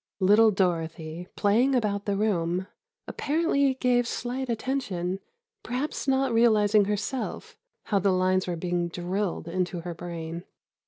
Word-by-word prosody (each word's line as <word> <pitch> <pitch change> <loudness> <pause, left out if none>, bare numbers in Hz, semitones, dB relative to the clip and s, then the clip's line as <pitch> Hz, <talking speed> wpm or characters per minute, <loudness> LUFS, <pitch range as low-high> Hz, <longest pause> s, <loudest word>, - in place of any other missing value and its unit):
Little 210 +4 +6
Dorothy, 170 -3 -2
playing 235 +7 +3
about 205 -4 0
the 200 -1 0
room, 185 -3 0 0.4
apparently 285 -3 +1
gave 245 -2 +2
slight 250 +2 -3
attention, 205 -7 -2 0.4
perhaps 265 +4 -3
not 265 -2 +2
realizing 215 -3 +4
herself 210 +5 -3 0.3
how 200 - +1
the 195 +1 +2
lines 185 0 +2
were 175 - -1
being 175 0 -1
drilled 180 +1 -3
into 180 0 -2
her 175 0 -5
brain. 170 0 -6
200 Hz, 125 wpm, -27 LUFS, 175-240 Hz, 0.4 s, Little